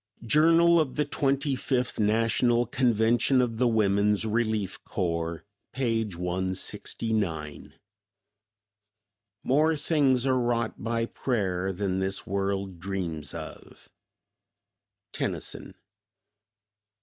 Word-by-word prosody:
Journal 165 +5 +5
of 150 -5 -1
the 150 - +1
Twenty 140 -1 0
fifth 125 -2 -1
National 115 +3 +2
Convention 120 0 +2
of 120 -3 0
the 125 - +4
Woman's 105 -1 +2
Relief 110 -3 -1
Corps, 85 -3 -3 0.3
page 115 -6 -1
169. 90 -1 -3 1.7
"More 155 +4 +3
things 140 -4 +2
are 130 -1 +2
wrought 120 -3 -1
by 115 +1 0
prayer 95 -7 -2
Than 95 0 -2
this 95 0 -3
world 95 -1 -2
dreams 85 -6 -4
of." - - -10 1.2
Tennyson. - - -4
110 Hz, 90 wpm, -27 LUFS, 95-130 Hz, 1.7 s, Journal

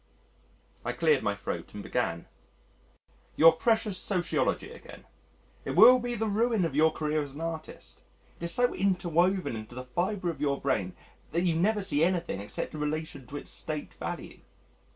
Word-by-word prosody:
I - - -2
cleared 460 - +3
my - - 0
throat - - -6
and - - -6
began, - - -2 1.1
"Your - - +8
precious 220 -5 +1
sociology 180 -3 0
again - - -12 0.6
it - - -4
will 255 0 +9
be 245 0 -3
the 225 0 -1
ruin 220 -2 +1
of 150 -5 -3
your 160 +2 +5
career 155 0 -1
as 140 -2 -7
an 155 - -7
artist. 165 -1 -6 0.4
It 170 - -4
is 170 - -3
so 245 +6 +2
interwoven 185 -4 +1
into 110 +2 -8
the 125 0 -6
fibre 175 +7 -1
of 165 - -11
your 140 -2 +1
brain 105 -10 -1 0.4
that 170 +2 +1
you 175 -2 +2
never 205 +5 +2
see 150 -4 +1
anything 175 - 0
except 105 - -5
in 155 - -6
relation 150 -3 -3
to 145 - -6
its - - -7
State 155 -2 -5
value. - - -6
170 Hz, 170 wpm, -29 LUFS, 150-200 Hz, 1.1 s, will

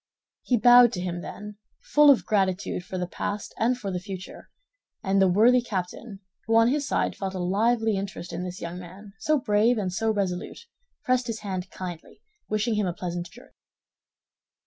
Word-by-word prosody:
He 245 - +1
bowed 245 +1 +7
to 180 - -3
him, 175 -1 -3
then, 210 +2 -9 0.2
full 295 0 +4
of 275 - +5
gratitude 190 -3 0
for 185 0 -6
the 180 - -1
past 205 +3 -5
and 245 +3 +2
for 200 -5 -5
the 180 - -2
future; 185 0 -9 0.5
and 195 -1 +2
the 190 - +5
worthy 230 +7 +5
captain, 200 0 -5 0.3
who 225 - +2
on 230 +1 +5
his 285 +2 0
side - - 0
felt 195 -1 -4
a - - -3
lively 220 +4 +1
interest 195 -3 -6
in 180 - -4
this 180 0 -7
young 170 +1 -5
man, 190 +3 -12
so 305 0 +2
brave 225 +1 +2
and 190 -4 -2
so 225 +4 0
resolute, 200 - -3 0.4
pressed 255 -1 +1
his 225 -1 -4
hand 190 -3 -4
kindly, 175 -3 -9 0.3
wishing 215 +2 0
him 210 -2 0
a 175 - -2
pleasant 175 0 -5
journey. 245 - -16
200 Hz, 185 wpm, -26 LUFS, 185-230 Hz, 0.5 s, bowed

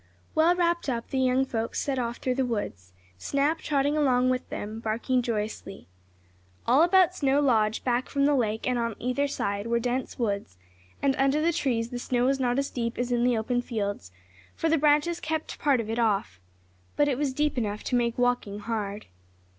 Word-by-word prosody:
Well 330 +3 +4
wrapped 345 -3 +1
up, 235 -2 -3
the 265 - 0
young 260 +1 +2
folks 230 -3 -3
set 270 -2 -1
off 235 -1 -2
through 255 - -1
the 265 +1 0
woods, 205 - -4 0.3
Snap 285 - 0
trotting 285 -1 0
along 255 -4 +3
with 255 0 -3
them, 215 +2 -5
barking 235 +3 0
joyously. 215 - -4 0.8
All 255 +6 +5
about 365 +1 +5
Snow 280 -4 +2
Lodge, 225 -6 +2
back 245 0 0
from 280 0 +1
the 290 - +4
lake, 220 -4 0
and 250 -1 +1
on 230 -2 -2
either 255 +4 0
side, 200 -5 -2
were 235 0 +1
dense 250 +2 -2
woods, 200 - -2 0.5
and 275 -1 +3
under 275 +2 +2
the 335 +2 +2
trees 235 -6 -1
the 245 - -4
snow 245 0 0
was 270 +1 +2
not 245 -1 +1
as 275 0 -1
deep 235 -1 -3
as 245 0 -2
in 240 -1 +2
the 245 -1 +3
open 245 +3 0
fields, 205 - -4 0.4
for 325 - 0
the 325 - +3
branches 300 +3 +3
kept 315 0 -4
part 280 -4 +3
of 225 - -3
it 225 +2 -2
off. 195 - 0 0.6
But 290 - +3
it 270 -2 0
was 290 -2 0
deep 295 +2 0
enough 210 -4 -2
to 250 - -1
make 235 -1 +1
walking 245 -5 0
hard. 210 -2 -4
250 Hz, 200 wpm, -27 LUFS, 225-280 Hz, 0.8 s, All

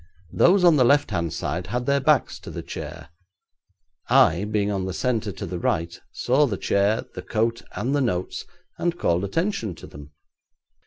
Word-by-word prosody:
Those 185 +1 +4
on 170 -4 +6
the 130 - +5
left 145 +4 +3
hand 85 -1 -1
side - - -3
had 125 +4 -2
their 140 +1 +2
backs 150 +1 +2
to - - -10
the - - -6
chair. - - -8 1.0
I, 85 +6 +4
being 105 -1 0
on 95 -2 -2
the 95 - -4
centre 115 -4 -1
to - - -6
the 90 - -5
right, 85 0 -1 0.2
saw 140 +4 +2
the 100 -6 -3
chair, 100 +4 +1
the - - -6
coat, 115 +1 -1
and 135 +4 -1
the 145 - +2
notes, 90 -8 -2 0.3
and 175 0 -1
called 85 - +1
attention 115 - -2
to - - -12
them. 70 0 -12
110 Hz, 180 wpm, -24 LUFS, 95-140 Hz, 1.0 s, on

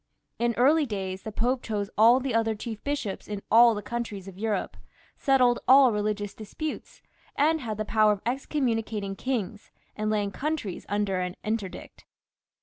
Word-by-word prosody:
In 235 0 +1
early 290 +4 +4
days 190 -3 -4
the 220 - -6
Pope 245 +4 0
chose 205 -2 -3
all 230 +4 +6
the 265 -1 -3
other 225 -1 +1
chief 220 0 -7
bishops 280 -9 -3
in 205 -1 -5
all 230 +1 +7
the 205 - -5
countries 210 -4 -5
of 195 - -9
Europe, 215 +2 -2 0.4
settled 255 -3 +3
all 265 -1 +7
religious 210 -1 -2
disputes, 260 +9 -7 0.3
and 315 +2 +2
had 220 -4 -4
the 215 - -2
power 215 0 +4
of 205 -1 -2
excommunicating 230 -6 -2
kings 220 -4 -3 0.3
and 215 0 -2
laying 205 -2 0
countries 285 - -4
under 200 -2 0
an 180 0 -3
interdict. 210 -3 -5
220 Hz, 160 wpm, -27 LUFS, 205-250 Hz, 0.4 s, all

